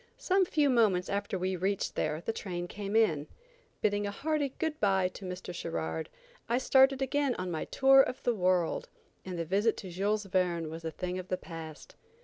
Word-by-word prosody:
Some 380 0 +2
few 300 -5 +2
moments 205 -7 +3
after 200 -1 -2
we 185 +1 -1
reached 190 +2 -1
there 155 +1 -1
the 225 - -2
train 175 -4 -4
came 200 +2 -5
in. 160 -10 +3 0.5
Bidding 205 -1 +1
a - - -1
hearty 295 +6 -1
good 320 -2 -2
bye 190 -3 +2
to 190 +1 -10
Mr. 180 -1 -6
Sherard, 80 - -3 0.4
I 235 - +3
started 265 +1 +4
again 280 -1 +1
on 185 -1 -4
my 160 - -2
tour 270 0 +6
of 255 - -2
the 245 - +2
world, 185 - +1 0.3
and 185 -2 -5
the 165 - -2
visit 205 +6 +1
to 185 - -7
Jules 205 +4 0
Verne 175 -4 0
was 165 +1 -7
a 165 - -2
thing 180 +2 -4
of 185 - -7
the 185 - -1
past. 160 -3 -9
190 Hz, 195 wpm, -30 LUFS, 175-240 Hz, 0.5 s, tour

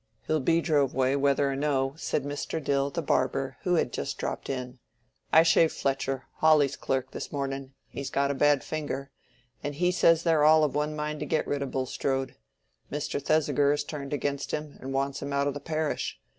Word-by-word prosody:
"He'll 155 0 +1
be 165 +5 +2
drove 145 -6 +1
away, 130 +1 +2
whether 140 0 +2
or - - -2
no," 135 -1 0
said 155 -3 -2
Mr. 145 +3 -3
Dill, 140 -2 0
the 165 +4 -3
barber, 135 -1 0
who 180 -1 +1
had 125 - 0
just 70 - -3
dropped - - -4
in. 125 -1 -4 0.5
"I 160 - +7
shaved 165 0 +4
Fletcher, 135 -1 -1
Hawley's 155 -3 +4
clerk, 130 -1 -2
this - - -6
morning—he's 135 -1 -5
got 140 0 +1
a - - 0
bad 145 0 +3
finger—and 140 -3 -7
he 180 +4 +2
says 165 -2 +4
they're 160 -3 +3
all 155 +1 +6
of 150 - +1
one 150 +1 -1
mind 150 0 -3
to 150 - -4
get 155 - +1
rid 145 -1 -2
of 140 - -2
Bulstrode. 135 0 -2 0.6
Mr. 145 0 -2
Thesiger 145 -1 +2
is 145 - -1
turned 140 -3 -6
against 140 -1 -2
him, 150 -1 -4
and 135 - -5
wants 135 +1 -1
him 140 0 -4
out 140 0 +1
o' 145 - +1
the 145 - -6
parish. 155 0 -2
140 Hz, 195 wpm, -28 LUFS, 135-150 Hz, 0.6 s, I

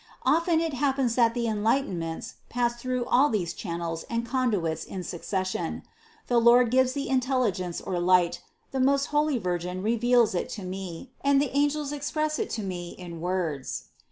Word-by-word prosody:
Often 335 0 +3
it 325 -2 -1
happens 265 -2 +1
that 230 -1 +3
the 240 -1 0
enlightenments 210 -7 -1 0.2
pass 240 0 0
through 255 -1 -1
all 270 +5 +4
these 175 -6 -1
channels 170 -3 -4
and 235 0 -1
conduits 215 - 0
in 185 -2 -6
succession: 185 +2 -3 0.4
the 240 -1 +3
Lord 235 0 +6
gives 260 0 +3
the 280 -1 -3
intelligence 250 -9 0
or 180 - -3
light, 175 -1 +3 0.3
the 265 - -2
most 275 +2 +3
holy 295 -2 +2
Virgin 180 -2 -3
reveals 235 0 +3
it 175 - -2
to 200 - -7
me 185 +4 -6
and 280 0 +4
the 280 -1 -1
angels 290 0 +1
express 305 +1 -1
it - - -1
to 220 - -3
me 175 -2 -5
in 170 -3 -8
words. 170 -7 -2
235 Hz, 165 wpm, -27 LUFS, 180-265 Hz, 0.4 s, Lord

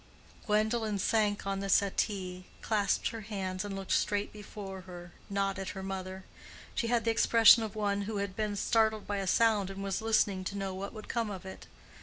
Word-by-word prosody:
Gwendolen 215 0 +1
sank 205 0 +1
on 195 0 -1
the 195 0 -3
settee, 190 -2 0 0.2
clasped 210 -3 +1
her 225 -1 -6
hands, 190 -3 -3
and 205 -1 -5
looked 195 -1 -6
straight 205 0 +1
before 200 -2 -8
her, 175 -1 -9 0.2
not 195 -1 -1
at 195 - -4
her 190 - -5
mother. 190 0 -5 0.5
She 230 - -1
had 235 -1 +1
the 230 - +3
expression 230 0 +7
of 220 -2 -4
one 205 -1 0
who 215 - -2
had 200 -2 -3
been 210 -1 -1
startled 220 0 +2
by 205 - -2
a 195 -1 -2
sound 210 -2 +3
and 195 0 -6
was 195 0 -2
listening 210 -4 +2
to 200 - -3
know 195 -1 -3
what 195 +2 -5
would 215 -2 -9
come 230 -2 -1
of 190 -2 -7
it. 190 - -9
200 Hz, 200 wpm, -31 LUFS, 195-215 Hz, 0.5 s, expression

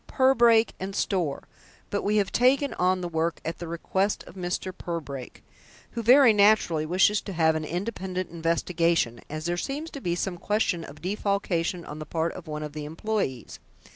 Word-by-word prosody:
Purbrake 235 -4 +4
& 195 - -7
Store, 175 -10 -1 0.5
but 205 - 0
we 210 +1 +1
have 200 -2 +1
taken 270 +3 +3
on 185 +1 +1
the 175 - -2
work 165 0 -1
at 165 - -4
the 170 - -6
request 190 +4 -1
of - - -13
Mr. 180 0 -3
Purbrake, 145 -7 -6 0.5
who 235 - -3
very 245 +1 +7
naturally 200 -7 +4
wishes 190 +4 +3
to 195 - -7
have 160 -2 +3
an 155 0 -2
independent 185 +1 -4
investigation, 165 -5 0
as 155 +1 -5
there 175 0 -1
seems 290 - -4
to 280 - -8
be 175 -5 -1
some 175 0 -3
question 205 -5 0
of 150 +1 -12
defalcation 185 -3 -1
on 150 - -8
the 155 - -7
part 165 +1 -1
of 180 - -10
one 150 0 -4
of 150 -1 -6
the 150 0 -5
employees. 160 - -3
180 Hz, 180 wpm, -26 LUFS, 165-205 Hz, 0.5 s, very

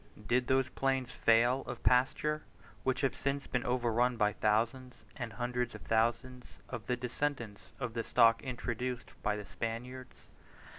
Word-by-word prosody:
Did 125 +3 +2
those 130 -1 +3
plains 135 -1 -1
fail 120 +3 +4
of - - -6
pasture, 150 +4 +2 0.4
which 130 +2 0
have 135 -3 +1
since 140 0 -2
been 125 - -1
overrun 120 0 +1
by 105 -2 +2
thousands 115 +4 0
and 120 -4 -5
hundreds 120 +2 -2
of - - -10
thousands 120 +3 0
of 120 -3 -6
the 125 - 0
descendants 125 -3 -3
of 125 -4 -3
the 115 0 -2
stock 115 -1 +5
introduced 125 -1 -4
by 105 - +1
the 105 -1 -6
Spaniards? 120 +6 -6
125 Hz, 150 wpm, -33 LUFS, 115-130 Hz, 0.4 s, stock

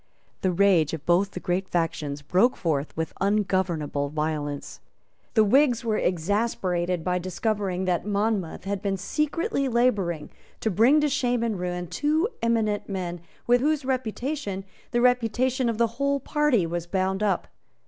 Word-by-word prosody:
The 185 - +2
rage 180 -4 +3
of 155 - -11
both 180 +3 +3
the 180 - -7
great 180 +2 -1
factions 150 -4 -2
broke 190 - +3
forth 150 -4 -2
with 160 0 -2
ungovernable 185 -8 0
violence. 150 -1 -3 0.6
The 220 - +6
Whigs 245 +2 +3
were 215 -2 +1
exasperated 180 -1 0
by 180 +1 0
discovering 190 0 -2
that 180 -2 0
Monmouth 205 -3 -1
had 195 0 -3
been 200 -2 -1
secretly 300 - -1
labouring 205 -10 +1 0.3
to 220 - 0
bring 245 - +5
to 300 - +3
shame 245 -4 0
and 220 -5 -1
ruin 180 0 -3
two 300 - +1
eminent 220 -3 0
men 175 -3 -4 0.2
with 245 +1 +4
whose 300 -1 +1
reputation 255 -4 -2 0.2
the 240 - +1
reputation 250 +1 +2
of 230 - -2
the 235 - +4 0.2
whole 280 0 +2
party 295 - +2
was 170 +1 -3
bound 190 +2 0
up. 210 -2 0
200 Hz, 150 wpm, -26 LUFS, 175-240 Hz, 0.6 s, The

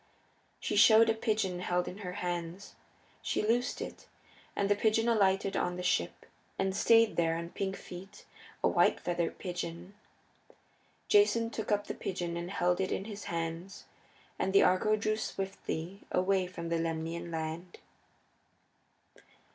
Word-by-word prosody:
She - - -2
showed 225 +1 +7
a - - +2
pigeon 215 -5 -1
held 180 0 0
in 190 - -7
her 180 -3 -5
hands. 175 +1 -4 0.5
She - - -1
loosed 240 +3 +1
it, - - -10 0.5
and 200 - +1
the 205 - +3
pigeon 220 +2 +2
alighted 195 -4 +2
on 180 0 0
the 180 - -4
ship, - - 0 0.3
and 195 0 0
stayed 225 +1 +4
there 165 -1 +2
on 170 0 -5
pink 195 -1 -2
feet, 190 +3 -11 0.4
a - - +5
white - - +3
feathered 170 -1 -2
pigeon. 175 0 -5 1.1
Jason 230 - +4
took 220 -2 -4
up 205 0 +2
the - - -4
pigeon 175 -2 -4
and 170 +1 -4
held 180 -1 +1
it 190 - -1
in 195 - -2
his 210 -2 -7
hands, 165 +2 -4 0.5
and 190 - 0
the 200 - +7
Argo 215 +4 +3
drew 215 0 0
swiftly 195 -3 -4
away 185 0 +2
from 170 -2 -6
the 165 0 +1
Lemnian 165 +1 -3
land. 165 +2 -5
190 Hz, 150 wpm, -31 LUFS, 170-205 Hz, 1.1 s, showed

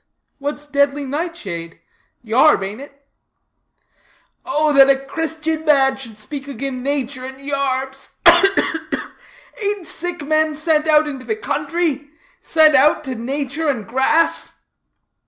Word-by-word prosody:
"What's 290 +1 -4
deadly 285 0 +1
nightshade? 260 - -5 0.4
Yarb, 240 +1 +4
ain't 205 +6 -6
it?" 280 0 -14 1.4
"Oh, 305 -3 +1
that 275 -1 +7
a 275 - +5
Christian 315 +3 -3
man 270 -3 +4
should 230 -5 -10
speak 275 +6 -7
agin 270 0 -5
natur 270 -1 -3
and 265 +1 -8
yarbs 270 -1 -3
ugh, 345 +3 +8
ugh, 325 - 0
ugh! - - 0 0.6
ain't 405 -3 -2
sick 345 -1 -5
men 310 +1 +1
sent 310 0 +1
out 305 0 +4
into 270 -3 -6
the 440 - -1
country; 330 -8 -2 0.3
sent 315 -1 +4
out 295 +2 +4
to 265 -3 -4
natur 280 +5 -3
and 235 -7 -2
grass?" 265 +7 +1
285 Hz, 135 wpm, -19 LUFS, 265-310 Hz, 1.4 s, ugh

